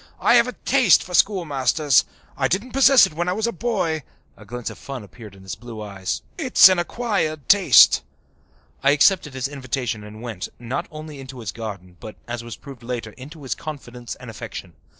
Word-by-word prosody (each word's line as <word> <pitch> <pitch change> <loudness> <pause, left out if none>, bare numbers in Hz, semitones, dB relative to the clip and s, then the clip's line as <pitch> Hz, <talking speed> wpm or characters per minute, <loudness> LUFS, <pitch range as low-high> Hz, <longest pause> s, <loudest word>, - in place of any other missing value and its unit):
I - - +3
have 240 0 +5
a 250 - -5
taste 250 -8 +3
for 180 - -11
schoolmasters. 150 - +2 0.3
I 135 - +1
didn't 200 - -2
possess 270 -1 +6
it - - -7
when 175 +3 -2
I - - +1
was 220 +3 -1
a 235 - 0
boy" 170 -7 -1 0.3
(a - - -15
glint 120 0 -6
of - - -13
fun 135 -4 -7
appeared 105 +1 -13
in 95 - -16
his 95 - -6
blue 120 -2 -9
eyes). 100 -3 -5 0.2
"It's 255 - +7
an 185 -1 +2
acquired 175 - -2
taste." 190 - +6 0.8
I 135 - +3
accepted 150 -2 +3
his 130 0 -2
invitation 130 -5 -4
and 105 +2 -11
went, 115 -7 -6
not 120 +2 -4
only 155 -2 -9
into 130 -1 -10
his 110 -5 -5
garden 95 -6 -8
but, 110 - -9
as 120 0 -5
was 120 -2 -8
proved 135 -1 -12
later, 120 -2 -5
into 145 +6 -12
his 130 - -2
confidence 125 -6 -8
and 125 -2 -10
affection. 95 -4 -8
135 Hz, 195 wpm, -22 LUFS, 115-175 Hz, 0.8 s, It's